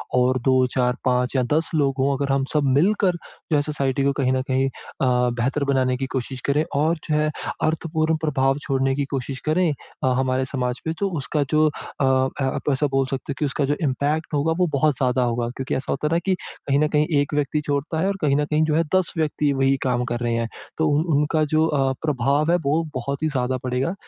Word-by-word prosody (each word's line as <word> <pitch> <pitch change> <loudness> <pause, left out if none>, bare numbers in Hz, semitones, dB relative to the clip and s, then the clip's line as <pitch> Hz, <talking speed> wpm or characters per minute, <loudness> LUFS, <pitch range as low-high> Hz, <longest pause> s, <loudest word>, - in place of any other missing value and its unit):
और 125 +1 +3
2-4-5 125 0 +1
या 130 - +3
10 160 +2 0
लोग 140 -3 +2
हों, 140 +1 +2
अगर 140 0 0
हम 135 -1 +1
सब 150 -1 +2
मिलकर 195 +3 +3
जो 160 -1 -6
हैं 145 - +4
सोसाइटी 140 -2 -1
को 140 - +3
कहीं 130 - +2
न 130 - +1
कहीं 130 0 +1
अ, - - -15 0.3
बेहतर 125 +2 +1
बनाने 130 -2 +1
की 135 - -2
कोशिश 130 0 -4
करें 145 +2 +2
और 155 +4 +2
जो 150 - +2
है 155 0 +2 0.3
अर्थपूर्ण 160 0 0
प्रभाव 135 -3 +1
छोड़ने 135 -1 0
की 140 - -1
कोशिश 130 0 -4
करें 180 +3 +3 0.4
अ, - - +3
हमारे 130 0 +1
समाज 125 -2 -2
पे - - -1
तो 200 - +1
उसका 145 +2 -1
जो 155 0 +4
अ, 145 -1 -5
आप 130 +1 0
ऐसा 145 +2 +1
बोल 135 0 +2
सकते 135 +1 -4
हो 135 - -4
कि 150 - +1
उसका 140 +1 -1
जो 145 +2 0
इम्पैक्ट 150 +4 -1
होगा, 145 +3 +1
वो 180 - +3
बहुत 145 0 +2
ज़्यादा 125 -1 +1
होगा 120 0 0
क्योंकि 135 0 -2
ऐसा 130 - -2
होता 150 +2 -1
है - - -3
ना 170 - +3
कि 190 - +2 0.3
कहीं 140 0 +3
न 150 - +3
कहीं 150 0 +1
एक 145 +1 -1
व्यक्ति 150 +1 0
छोड़ता 145 +3 -1
है 190 - +1
और 200 - -1
कहीं 140 -2 +2
न 145 0 +1
कहीं 150 +1 +1
जो 155 -1 +1
हैं, 165 - +3
10 185 -2 +1
व्यक्ति 150 -2 +1
वही 135 0 +2
काम 125 -1 +1
कर 120 - -1
रहे 120 -1 -1
हैं। 115 0 -1 0.3
तो 160 0 +2
उ 145 +1 +2 0.2
उनका 155 +1 +1
जो 155 +1 +4
अ, 135 -4 +1
प्रभाव 145 +2 +1
है, 175 - +4
वो 160 +1 0
बहुत 140 +4 -3
ही - - +3
ज़्यादा 130 -2 -1
पड़ेगा। 130 +6 -1
140 Hz, 230 wpm, -23 LUFS, 130-155 Hz, 0.4 s, हैं